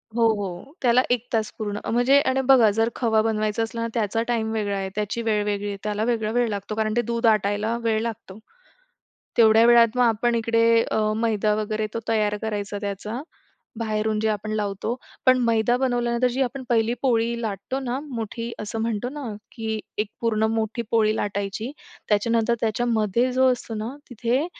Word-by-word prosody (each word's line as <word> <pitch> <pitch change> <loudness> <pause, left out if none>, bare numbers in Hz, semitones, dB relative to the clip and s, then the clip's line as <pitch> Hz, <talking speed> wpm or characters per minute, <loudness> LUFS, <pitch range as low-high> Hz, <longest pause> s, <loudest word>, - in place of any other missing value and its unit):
हो, 235 - +2
हो. 200 +6 -6
त्याला 245 0 +4
1 245 -1 0
तास 220 -2 0
पूर्ण. 205 -1 -3
म्हणजे 245 +4 +4
आणि 265 +1 +1
बघा 255 -5 +7
जर 225 +1 +3
खवा 220 -3 +2
बनवायचं 215 0 0
असलं 230 +1 -4
ना 230 - -1
त्याचा 225 -1 0
टाईम 225 -2 0
वेगळा 205 -2 -1
आहे, 195 0 -3
त्याची 210 +2 -2
वेळ 215 -2 +1
वेगळी 205 0 -2
आहे, 200 - -4
त्याला 210 0 -1
वेगळा 220 -3 0
वेळ 245 0 +2
लागतो, 205 +1 -4
कारण 215 0 0
ते - - +4
दूध 235 +1 -2
आटायला 215 +1 +2
वेळ 220 -1 +1
लागतो. 220 -3 -6 1.0
तेवढ्या 225 -1 +6
वेळात 235 -1 +5
मग 250 - +4
आपण 235 +1 +2
इकडे 230 0 +2 0.3
अ, - - +1 0.2
मैदा 215 -2 +1
वगैरे 215 0 -1
तो - - -1
तयार 210 -2 +1
करायचा 205 -1 -3
त्याचा, 205 +4 -4 0.6
बाहेरून 215 -1 -1
जे 220 - +1
आपण 215 0 -2
लावतो, 210 +1 -2 0.3
पण 255 0 +6
मैदा 230 +1 +2
बनवल्यानंतर 245 -1 +1
जी 260 +2 -1
आपण 260 +1 -3
पहिली 230 0 +2
पोळी 235 -2 +1
लाटतो 220 +5 -3
ना, 255 0 -2
मोठी 230 -1 -5
असं 215 +1 -4
म्हणतो 230 +1 -1
ना 290 +2 -7 0.3
की 220 -2 -3 0.2
एक 210 0 0
पूर्ण 220 -2 +1
मोठी 225 +1 -1
पोळी 220 -1 +3
लाटायची, 205 +4 -3 0.4
त्याच्यानंतर 230 +2 +2
त्याच्यामध्ये 230 +1 +1
जो 260 +1 +4
असतो 240 -2 -5
ना, 220 +6 -5
तिथे 245 +5 0
225 Hz, 180 wpm, -24 LUFS, 215-235 Hz, 1.0 s, बघा